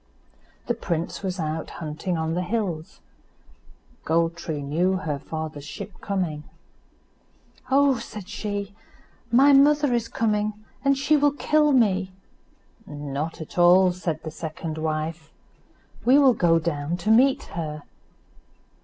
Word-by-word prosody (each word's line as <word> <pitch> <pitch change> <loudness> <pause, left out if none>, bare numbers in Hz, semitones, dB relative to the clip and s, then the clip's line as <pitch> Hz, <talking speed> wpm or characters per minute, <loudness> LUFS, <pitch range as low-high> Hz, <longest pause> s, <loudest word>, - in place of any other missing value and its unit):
The 240 - 0
prince 170 -7 -3
was 190 -1 -3
out 155 0 -3
hunting 165 +3 -3
on 160 0 -1
the 180 - -1
hills. 180 -5 -3 1.0
Gold 165 +1 +1
tree 155 -3 -5
knew 170 +7 +1
her 160 -7 -2
father's 155 -1 -6
ship 180 +7 -9
coming. 175 -7 -2 1.3
"Oh!" 275 -2 +4
said 210 -4 -8
she, 205 -1 -4 0.6
"my 275 +4 +6
mother 290 0 +5
is 235 -1 0
coming, 215 -2 0 0.3
and 275 0 +3
she 290 +3 +3
will 290 0 +3
kill 300 0 +2
me." 195 -7 +2 0.8
"Not 145 +2 -5
at 160 - -6
all," 180 +1 +6
said 170 -3 -4
the 160 - -5
second 160 0 -6
wife; 155 +1 -3 0.7
"we 255 +3 +5
will 275 -3 +6
go 170 -6 +3
down 160 0 -2
to 180 +5 0
meet 260 +4 +4
her." 155 -3 -5
175 Hz, 130 wpm, -24 LUFS, 160-225 Hz, 1.3 s, my